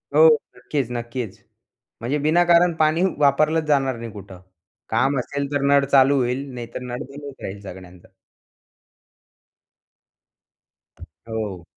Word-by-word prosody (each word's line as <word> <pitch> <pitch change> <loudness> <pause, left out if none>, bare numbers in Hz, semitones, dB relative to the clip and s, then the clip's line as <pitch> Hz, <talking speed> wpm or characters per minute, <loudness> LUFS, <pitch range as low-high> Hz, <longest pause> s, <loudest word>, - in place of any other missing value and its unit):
हो, 160 +1 +8 0.3
नक्कीच, 125 0 -3
नक्कीच. 120 -2 -5 0.6
म्हणजे 125 +6 -1
विनाकारण 175 +2 +4
पाणी 155 +2 +3
वापरलंच 150 +3 +3
जाणार 135 -3 +2
नाही 115 -1 -7
कुठं. 100 -3 -11 0.5
काम 135 +5 +1
असेल 140 +3 -4
तर 145 - 0
नळ 140 -1 +4
चालू 140 0 +4
होईल, 125 +2 -1
नाहीतर 120 0 -7
नळ 125 -1 -5
बंदच 140 0 -10
राहील 100 +1 -6
सगळ्यांचा. 90 -2 -12 2.9
हो. 105 -6 -7
135 Hz, 110 wpm, -22 LUFS, 115-145 Hz, 2.9 s, हो